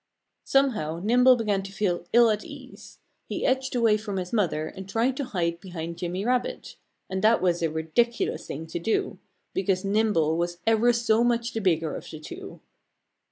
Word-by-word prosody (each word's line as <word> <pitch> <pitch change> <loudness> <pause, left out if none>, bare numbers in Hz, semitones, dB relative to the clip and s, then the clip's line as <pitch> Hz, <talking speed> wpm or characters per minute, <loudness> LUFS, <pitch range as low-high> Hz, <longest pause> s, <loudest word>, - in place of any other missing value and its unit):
Somehow 215 - +1
Nimble 250 +4 +6
began 210 -4 0
to 195 0 -8
feel 180 -4 -1
ill 235 -1 +6
at 210 0 -2
ease. 285 -4 -12 0.3
He - - -3
edged 260 0 0
away 225 -3 +4
from 205 -2 -5
his 180 +1 -4
mother 175 -8 +1
and 190 +4 -9
tried 235 +5 +1
to 280 - -2
hide 170 -6 -2
behind 170 -3 -7
Jimmy 180 +3 -3
Rabbit. 250 0 -1 0.3
And 190 0 -3
that 225 +2 +5
was 175 -2 +1
a 165 - +1
ridiculous 160 +10 -1
thing 155 +3 -5
to 165 +1 -5
do; 220 +6 -1 0.3
because 190 0 0
Nimble 195 -7 +2
was 175 0 -2
ever 225 +2 +4
so 235 -1 +2
much 235 0 0
the 225 - -2
bigger 165 -5 +1
of - - -8
the 155 - -8
two. 155 - -9
205 Hz, 180 wpm, -26 LUFS, 175-235 Hz, 0.3 s, Nimble